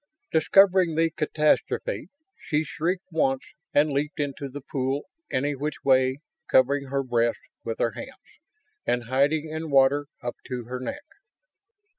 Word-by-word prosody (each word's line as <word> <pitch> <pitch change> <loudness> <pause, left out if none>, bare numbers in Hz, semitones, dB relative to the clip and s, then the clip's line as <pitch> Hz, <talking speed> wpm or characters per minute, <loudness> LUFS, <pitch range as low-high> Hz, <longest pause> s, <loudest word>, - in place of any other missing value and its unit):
Discovering 185 0 +5
the 165 0 +2
catastrophe, 155 - 0 0.3
she 150 +1 -1
shrieked 175 +5 -2
once 135 -5 +1 0.3
and 150 +1 +3
leaped 145 +3 -2
into 140 -1 -3
the 140 +2 -7
pool 135 +1 -2 0.3
any 145 +3 0
which 150 +3 -4
way, 130 -1 +4 0.3
covering 140 +2 +3
her 135 +1 -1
breasts 120 -2 0 0.2
with 115 -1 -3
her 115 - +1
hands 260 -1 -11 0.4
and 120 0 0
hiding 140 +6 +1
in 160 +1 -5
water 140 +1 +4 0.2
up 120 - -4
to 125 -2 -4
her 125 +2 -5
neck. 290 - -5
140 Hz, 140 wpm, -26 LUFS, 130-155 Hz, 0.4 s, Discovering